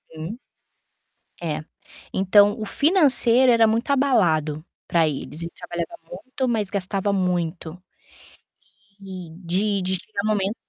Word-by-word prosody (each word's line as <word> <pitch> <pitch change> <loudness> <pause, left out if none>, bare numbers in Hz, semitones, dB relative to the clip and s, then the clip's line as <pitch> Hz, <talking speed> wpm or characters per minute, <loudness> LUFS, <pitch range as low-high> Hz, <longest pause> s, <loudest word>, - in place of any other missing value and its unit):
Uhum. 165 +9 -7 1.0
É. 155 -3 -3 0.5
Então 205 +3 +4
o 215 - -3
financeiro 265 - +4
era 230 -1 +5
muito 225 +5 -1
abalado 170 - +1 0.2
pra 165 -2 +2
eles. 150 +2 -5
Ele 170 - -5
trabalhava 170 -1 -6
muito, 250 +9 -5
mas 215 -4 -1
gastava 200 0 -1
muito. 175 -2 -2 1.2
E 185 -4 -9
de 195 +3 0
de 185 +1 0
chegar 200 +2 -5
momento 210 -1 0
195 Hz, 120 wpm, -22 LUFS, 170-225 Hz, 1.2 s, era